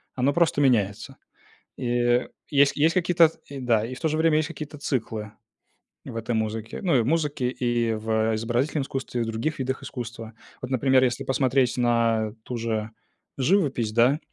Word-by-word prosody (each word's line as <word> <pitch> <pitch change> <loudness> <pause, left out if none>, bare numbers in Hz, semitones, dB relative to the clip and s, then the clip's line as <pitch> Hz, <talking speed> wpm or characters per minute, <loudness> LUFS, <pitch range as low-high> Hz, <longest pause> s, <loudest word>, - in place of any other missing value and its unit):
Оно 135 +2 +1
просто 165 -2 +2
меняется. 120 0 +1 0.6
И, - - -5
э, 120 0 +2 0.2
есть 140 -1 +4
есть 160 +3 +3
какие-то, 175 -2 +4 0.2
и 140 -1 -8
да, 115 -4 +2
и 130 - -6
в 125 - -11
то 160 - +1
же 155 - -1
время 160 -1 +3
есть 155 0 +1
какие-то 155 -2 -8
циклы 110 -6 -3 0.7
в - - -8
этой 115 +1 -2
музыке, 110 +1 -3
ну, 175 -8 +2
и - - +4
в - - -4
музыке, 150 -4 0
и 120 -2 0
в 110 0 0
изобразительном 120 +7 -1
искусстве, 135 -2 -4
и - - +1
в - - -5
других 115 +8 -2
видах 130 0 -2
искусства. 115 -3 -7 0.3
Вот, 125 - -6
например, 130 0 +3
если 130 +2 -1
посмотреть 130 -1 +1
на 115 -3 +1
ту 125 - -5
же 110 -2 -2 0.5
живопись, 135 - +1
да, 120 +6 +4
125 Hz, 180 wpm, -25 LUFS, 115-140 Hz, 0.7 s, есть